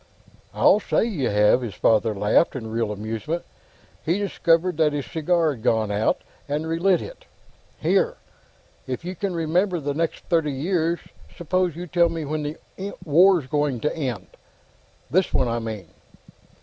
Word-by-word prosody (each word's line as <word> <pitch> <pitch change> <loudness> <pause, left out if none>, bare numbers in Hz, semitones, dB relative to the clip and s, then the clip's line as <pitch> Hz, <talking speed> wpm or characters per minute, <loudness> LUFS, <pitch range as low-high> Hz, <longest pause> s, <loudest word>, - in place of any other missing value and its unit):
"I'll 210 - +4
say - - +1
you 160 - -1
have!" 105 +4 +4
His 110 -6 -5
father 110 +2 +2
laughed 105 +11 +2
in 110 -4 -5
real 115 -1 -1
amusement. 110 - -4 0.6
He 170 +4 +1
discovered 180 -4 +1
that 155 -2 +3
his 145 -2 -2
cigar 165 -1 +1
had 120 - -12
gone 110 -2 +1
out, 105 +2 0 0.3
and 150 +2 -1
re 165 +1 -1
lit 190 0 +3
it. - - -11 0.5
"Here; 485 +1 +1 0.7
if 130 +6 -4
you 185 +1 -4
can 190 -1 -3
remember 175 +3 +1
the 145 -1 -2
next 165 +2 -2
thirty 165 -5 +1
years, 170 +3 0 0.4
suppose 175 0 0
you 175 +2 -6
tell 175 0 +3
me 165 -2 -4
when 155 +2 -2
the 150 +1 -4 0.5
War's 175 +1 +5
going 145 -2 0
to 150 - -1
end. 125 - -3 0.9
This 185 +3 +2
one, 130 - +2
I 120 0 -1
mean." 110 -6 -6
155 Hz, 160 wpm, -23 LUFS, 120-175 Hz, 0.9 s, War's